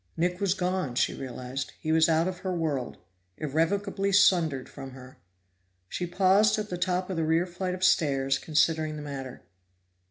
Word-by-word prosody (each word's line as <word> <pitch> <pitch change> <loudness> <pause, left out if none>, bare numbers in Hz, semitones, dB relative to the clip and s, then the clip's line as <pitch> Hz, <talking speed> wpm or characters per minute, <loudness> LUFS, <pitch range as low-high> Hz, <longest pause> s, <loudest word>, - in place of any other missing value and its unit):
Nick 180 +2 0
was 195 -1 +2
gone, 180 -8 -2
she - - +1
realized; 130 +1 -6
he 155 - -2
was 160 0 +4
out 165 +2 +2
of 185 -1 -4
her 190 - -3
world, 155 -8 -2 0.4
irrevocably 195 +7 0
sundered 170 -9 +3
from 135 -2 -10
her. 130 0 -13 0.7
She 175 - -3
paused 195 +4 +3
at 210 0 -4
the - - -1
top 180 +1 -1
of 180 - -3
the 165 - +1
rear 160 +2 +2
flight 180 +1 -4
of 185 - -7
stairs, 140 -6 +2
considering 155 0 +1
the 150 - -7
matter. 135 -3 -7
165 Hz, 170 wpm, -27 LUFS, 140-185 Hz, 0.7 s, was